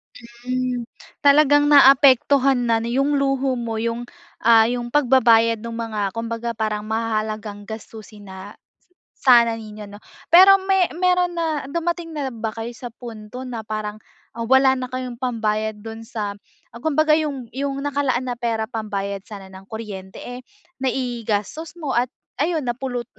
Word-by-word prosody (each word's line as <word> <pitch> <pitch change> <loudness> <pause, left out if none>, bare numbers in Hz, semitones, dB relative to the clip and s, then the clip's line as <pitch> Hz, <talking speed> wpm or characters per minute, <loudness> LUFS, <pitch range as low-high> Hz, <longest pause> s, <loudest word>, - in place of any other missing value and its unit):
Hmm, 250 +1 -4 0.4
talagang 290 0 +5
naapektuhan 270 -2 +5
na 225 0 +1
nu 235 - -3
yung 275 +3 +1
luho 270 -1 0
mo 225 -2 -3
yung, 230 +1 -2 0.4
ah, 225 -1 +6
yung 240 -1 -3
pagbabayad 235 -5 +4
nung 230 0 -5
mga 210 -4 -2
kumbaga 230 +1 -4
parang 215 -1 -3
mahahalagang 215 -1 -3
gastusin 215 -1 -10
na 190 +2 -9 0.7
sana 235 -3 +6
ninyo 215 -1 -9
'no. 205 - -11 0.3
Pero 385 +2 +9
me 385 -2 +3
meron 360 -1 +2
na, 315 -3 -1
dumating 340 +1 -2
na 275 -3 -3
ba 225 -1 -3
kayo 225 +1 -5
sa 245 - -7
punto 230 +1 -9
na 240 -3 -5
parang, 215 0 -5 0.3
ah, 230 - -7
wala 265 0 +5
na 255 -1 -4
kayong 255 -2 -5
pambayad 220 -3 -1
dun 225 0 -7
sa, 215 -2 -4 0.4
ah, 235 - -10
kumbaga 310 0 +2
yung 290 -5 -2
yung 275 +1 -2
nakalaan 275 -3 0
na 250 - -2
pera 230 -2 -2
pambayad 200 -4 -4
sana 200 -3 -9
ng 190 +1 -13
kuryente, 200 -4 -8
eh, 245 +1 -8 0.4
naigastos 245 - -3
mo 295 -5 -3
at 245 +2 +2 0.3
ayun 320 -2 0
napulut 245 0 -3
240 Hz, 150 wpm, -21 LUFS, 220-270 Hz, 0.7 s, Pero